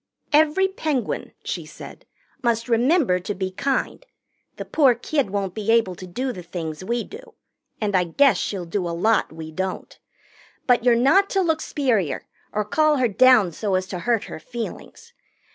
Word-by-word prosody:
"Every 315 Hz, +5 st, +4 dB
Penguin," 310 Hz, -9 st, -3 dB
she -, -, -4 dB
said, -, -, -12 dB, 0.3 s
"must 235 Hz, -1 st, 0 dB
remember 245 Hz, -, +3 dB
to 195 Hz, +3 st, -5 dB
be 185 Hz, 0 st, -3 dB
kind. 270 Hz, -, -2 dB, 0.5 s
The -, -, -6 dB
poor 270 Hz, -6 st, +4 dB
kid 270 Hz, 0 st, -1 dB
won't 195 Hz, -2 st, -2 dB
be 215 Hz, +1 st, -4 dB
able 225 Hz, -5 st, +3 dB
to 185 Hz, +1 st, -10 dB
do 255 Hz, +9 st, -3 dB
the 180 Hz, -, -8 dB
things 170 Hz, -1 st, -6 dB
we 235 Hz, +4 st, -1 dB
do, 465 Hz, +2 st, -12 dB, 0.4 s
and 205 Hz, -3 st, -1 dB
I 180 Hz, -1 st, +3 dB
guess 270 Hz, +11 st, +3 dB
she'll 190 Hz, -4 st, -3 dB
do 175 Hz, +1 st, -2 dB
a 170 Hz, -, -4 dB
lot 220 Hz, +5 st, +2 dB
we 160 Hz, 0 st, -8 dB
don't. 190 Hz, +3 st, -5 dB, 0.7 s
But 245 Hz, -2 st, +3 dB
you're 245 Hz, -1 st, +5 dB
not 275 Hz, +12 st, +4 dB
to 390 Hz, -, +1 dB
look 320 Hz, -3 st, +1 dB
s'perior 230 Hz, -, 0 dB, 0.3 s
or 210 Hz, 0 st, -1 dB
call 305 Hz, +6 st, +2 dB
her 255 Hz, -2 st, +2 dB
down 225 Hz, -4 st, +5 dB
so 200 Hz, +3 st, -2 dB
as 185 Hz, 0 st, 0 dB
to 185 Hz, -4 st, -4 dB
hurt 230 Hz, +3 st, 0 dB
her -, -, -8 dB
feelings. 240 Hz, -, -8 dB
230 Hz, 180 wpm, -23 LUFS, 185-275 Hz, 0.7 s, you're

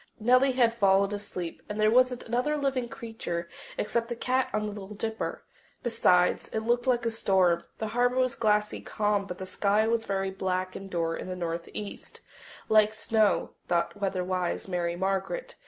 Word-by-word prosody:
Nellie 255 Hz, +4 st, +4 dB
had 240 Hz, -3 st, +3 dB
fallen 200 Hz, -2 st, +3 dB
asleep, 185 Hz, -4 st, -5 dB
and 210 Hz, +1 st, -4 dB
there 215 Hz, 0 st, +4 dB
wasn't 250 Hz, 0 st, +3 dB
another 250 Hz, +6 st, 0 dB
living 270 Hz, -4 st, -1 dB
creature 175 Hz, -9 st, -5 dB, 0.3 s
except 230 Hz, +2 st, -1 dB
the 240 Hz, -, -2 dB
cat 255 Hz, +2 st, 0 dB
on 215 Hz, -, 0 dB
the 210 Hz, -, -3 dB
Little 205 Hz, 0 st, -8 dB
Dipper. 220 Hz, +2 st, -3 dB, 0.4 s
Besides, 180 Hz, -7 st, +3 dB
it 220 Hz, -, -3 dB
looked 240 Hz, +2 st, 0 dB
like 245 Hz, -2 st, +2 dB
a 230 Hz, -, +1 dB
storm. 185 Hz, -6 st, +2 dB
The 220 Hz, -, -3 dB
harbour 245 Hz, +2 st, +2 dB
was 255 Hz, -1 st, +2 dB
glassy 210 Hz, -1 st, +1 dB
calm, 205 Hz, -1 st, 0 dB
but 180 Hz, -, -6 dB
the 190 Hz, -, -6 dB
sky 205 Hz, +3 st, +1 dB
was 230 Hz, 0 st, +1 dB
very 195 Hz, -1 st, -1 dB
black 185 Hz, -1 st, -2 dB
and 195 Hz, 0 st, -7 dB
dour 165 Hz, -2 st, -1 dB
in -, -, -6 dB
the 185 Hz, -, -4 dB
northeast 170 Hz, +4 st, -5 dB, 0.5 s
like 215 Hz, 0 st, +4 dB
snow, 215 Hz, -1 st, +2 dB, 0.2 s
thought 170 Hz, -1 st, 0 dB
weather 195 Hz, -2 st, -1 dB
wise 180 Hz, 0 st, -2 dB
Mary 175 Hz, -2 st, -1 dB
Margaret. 195 Hz, -, -2 dB
210 Hz, 175 wpm, -28 LUFS, 185-235 Hz, 0.5 s, Nellie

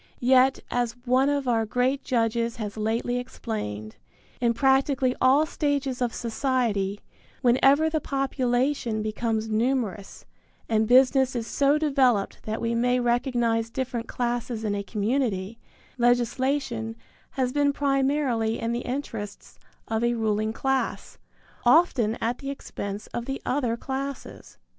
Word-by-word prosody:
Yet, 260 Hz, +1 st, +4 dB
as 245 Hz, -2 st, 0 dB
one 260 Hz, +3 st, +3 dB
of 285 Hz, -2 st, -1 dB
our 230 Hz, -2 st, +2 dB
great 250 Hz, +5 st, 0 dB
judges 230 Hz, -1 st, 0 dB
has 210 Hz, -3 st, -5 dB
lately 225 Hz, +3 st, -1 dB
explained, 110 Hz, -, -5 dB, 0.4 s
in 235 Hz, -1 st, +1 dB
practically 265 Hz, 0 st, +2 dB
all 270 Hz, +4 st, +5 dB
stages 280 Hz, -4 st, -1 dB
of 245 Hz, -2 st, +1 dB
society, 225 Hz, -5 st, -1 dB, 0.4 s
whenever 270 Hz, +5 st, +4 dB
the 315 Hz, -1 st, -1 dB
population 260 Hz, -4 st, 0 dB
becomes 220 Hz, 0 st, -1 dB
numerous 220 Hz, -3 st, -2 dB, 0.4 s
and 220 Hz, -1 st, +2 dB
business 260 Hz, +1 st, +4 dB
is 235 Hz, -2 st, -2 dB
so 280 Hz, +4 st, +2 dB
developed 265 Hz, -9 st, +1 dB
that 220 Hz, +1 st, -2 dB
we 230 Hz, 0 st, -1 dB
may 245 Hz, +2 st, +2 dB
recognize 240 Hz, -2 st, +1 dB
different 240 Hz, -1 st, -3 dB
classes 240 Hz, -2 st, -2 dB
in 210 Hz, -2 st, 0 dB
a 200 Hz, -, -2 dB
community, 215 Hz, -1 st, -1 dB, 0.4 s
legislation 240 Hz, -1 st, +1 dB, 0.4 s
has 255 Hz, -1 st, 0 dB
been 285 Hz, -1 st, +3 dB
primarily 275 Hz, -5 st, +1 dB
in 230 Hz, -, -2 dB
the 235 Hz, -, -1 dB
interests 245 Hz, -6 st, -6 dB, 0.3 s
of 225 Hz, +1 st, -1 dB
a 240 Hz, 0 st, +2 dB
ruling 215 Hz, -1 st, 0 dB
class, 265 Hz, +3 st, -2 dB, 0.4 s
often 245 Hz, -5 st, +4 dB
at 235 Hz, +2 st, -1 dB
the 275 Hz, -, -5 dB
expense 205 Hz, -6 st, -6 dB
of 240 Hz, -, -3 dB
the 270 Hz, +1 st, -4 dB
other 250 Hz, -4 st, 0 dB
classes. 270 Hz, +2 st, -6 dB
245 Hz, 130 wpm, -26 LUFS, 225-270 Hz, 0.4 s, all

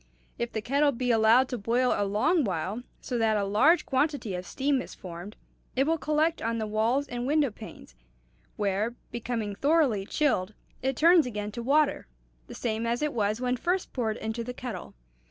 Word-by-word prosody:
If 235 Hz, 0 st, -2 dB
the 220 Hz, -, -4 dB
kettle 285 Hz, +4 st, +3 dB
be 250 Hz, -1 st, -1 dB
allowed 225 Hz, +3 st, +5 dB
to 250 Hz, -, -3 dB
boil 240 Hz, +5 st, +2 dB
a 205 Hz, -, 0 dB
long 300 Hz, -, +2 dB
while, 190 Hz, +2 st, -2 dB, 0.2 s
so 245 Hz, -, -3 dB
that 220 Hz, -1 st, +2 dB
a 205 Hz, -, 0 dB
large 235 Hz, -, +4 dB
quantity 270 Hz, -, 0 dB
of 180 Hz, 0 st, -5 dB
steam 275 Hz, -1 st, 0 dB
is -, -, -9 dB
formed, 180 Hz, +3 st, -9 dB, 0.4 s
it 265 Hz, -, +3 dB
will 325 Hz, +1 st, +1 dB
collect 310 Hz, +2 st, +1 dB
on 230 Hz, +1 st, -1 dB
the 220 Hz, -, -2 dB
walls 225 Hz, +7 st, +1 dB
and 245 Hz, +1 st, -4 dB
window 290 Hz, -3 st, +2 dB
panes, 210 Hz, -, -12 dB, 0.6 s
where, 205 Hz, +3 st, -1 dB, 0.2 s
becoming 230 Hz, -3 st, -3 dB
thoroughly 275 Hz, -6 st, +2 dB
chilled, 215 Hz, -10 st, 0 dB, 0.3 s
it 265 Hz, 0 st, 0 dB
turns 335 Hz, -2 st, +6 dB
again 210 Hz, -3 st, -4 dB
to 235 Hz, -, -5 dB
water, 285 Hz, +4 st, +2 dB, 0.4 s
the -, -, -9 dB
same 225 Hz, 0 st, -2 dB
as 240 Hz, +5 st, 0 dB
it 300 Hz, -, 0 dB
was 215 Hz, -1 st, 0 dB
when 250 Hz, 0 st, 0 dB
first 355 Hz, +8 st, -1 dB
poured 225 Hz, -4 st, -1 dB
into 220 Hz, +2 st, -4 dB
the 250 Hz, +1 st, -6 dB
kettle. 235 Hz, -9 st, -7 dB
235 Hz, 190 wpm, -28 LUFS, 215-280 Hz, 0.6 s, turns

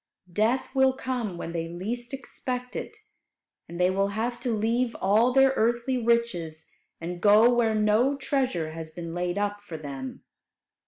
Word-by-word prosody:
Death 225 Hz, +8 st, +1 dB
will 265 Hz, -1 st, +4 dB
come 250 Hz, -8 st, -3 dB
when 170 Hz, -, -5 dB
they 165 Hz, -1 st, -3 dB
least 230 Hz, +8 st, -5 dB
expect 250 Hz, -1 st, -5 dB
it, 435 Hz, -, -5 dB, 0.7 s
and 170 Hz, +1 st, -7 dB
they 180 Hz, +1 st, +4 dB
will 195 Hz, +1 st, +1 dB
have 225 Hz, +4 st, -2 dB
to 245 Hz, -, -3 dB
leave 230 Hz, +2 st, 0 dB
all 215 Hz, +6 st, +4 dB
their 270 Hz, +1 st, +5 dB
earthly 240 Hz, +3 st, +1 dB
riches, 180 Hz, -9 st, 0 dB, 0.3 s
and 175 Hz, +1 st, -5 dB
go 215 Hz, +4 st, +6 dB
where 230 Hz, -2 st, +2 dB
no 215 Hz, +6 st, +3 dB
treasure 260 Hz, -, -1 dB
has 160 Hz, 0 st, -7 dB
been 165 Hz, +1 st, -7 dB
laid 175 Hz, +1 st, -2 dB
up 205 Hz, 0 st, -1 dB
for 175 Hz, -6 st, -8 dB
them. 135 Hz, -3 st, -7 dB
220 Hz, 160 wpm, -27 LUFS, 175-245 Hz, 0.7 s, go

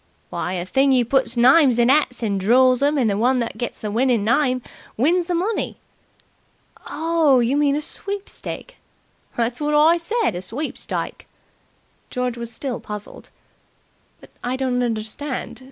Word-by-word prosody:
"Why, 180 Hz, -, -3 dB
a 175 Hz, -1 st, -3 dB
thing 270 Hz, +8 st, +2 dB
you 250 Hz, -2 st, +3 dB
puts 265 Hz, 0 st, +1 dB
names 260 Hz, +1 st, +5 dB
in 240 Hz, +1 st, +4 dB
'ats 270 Hz, -4 st, +1 dB
and 200 Hz, -3 st, 0 dB
draw 255 Hz, +6 st, +5 dB
'em 285 Hz, +4 st, +1 dB
and 250 Hz, -5 st, +2 dB
the 200 Hz, -1 st, 0 dB
one 255 Hz, +3 st, +3 dB
that 235 Hz, -2 st, -2 dB
gets 240 Hz, -, -4 dB
the 210 Hz, -, -4 dB
winning 235 Hz, -1 st, +2 dB
name 255 Hz, +2 st, +1 dB, 0.3 s
wins 335 Hz, +8 st, +2 dB
the 355 Hz, -, 0 dB
money." 395 Hz, +6 st, -2 dB, 1.1 s
"Oh, 320 Hz, -4 st, +2 dB
you 240 Hz, +3 st, +1 dB
mean 290 Hz, -1 st, +2 dB
a 300 Hz, -, -1 dB
sweepstake!" 405 Hz, +8 st, -6 dB, 0.6 s
"That's 235 Hz, +3 st, -1 dB
wot 295 Hz, 0 st, 0 dB
I 315 Hz, +3 st, +5 dB
said 425 Hz, -, -1 dB
a 175 Hz, -, -5 dB
sweepstike." 250 Hz, +11 st, -5 dB, 0.8 s
George 250 Hz, -1 st, -2 dB
was 235 Hz, -1 st, -6 dB
still 245 Hz, +1 st, -4 dB
puzzled. 210 Hz, -1 st, -8 dB, 0.9 s
"But -, -, -17 dB
I 245 Hz, +1 st, -1 dB
don't 255 Hz, -1 st, -1 dB
understand. 235 Hz, +2 st, -3 dB
255 Hz, 155 wpm, -21 LUFS, 235-295 Hz, 1.1 s, names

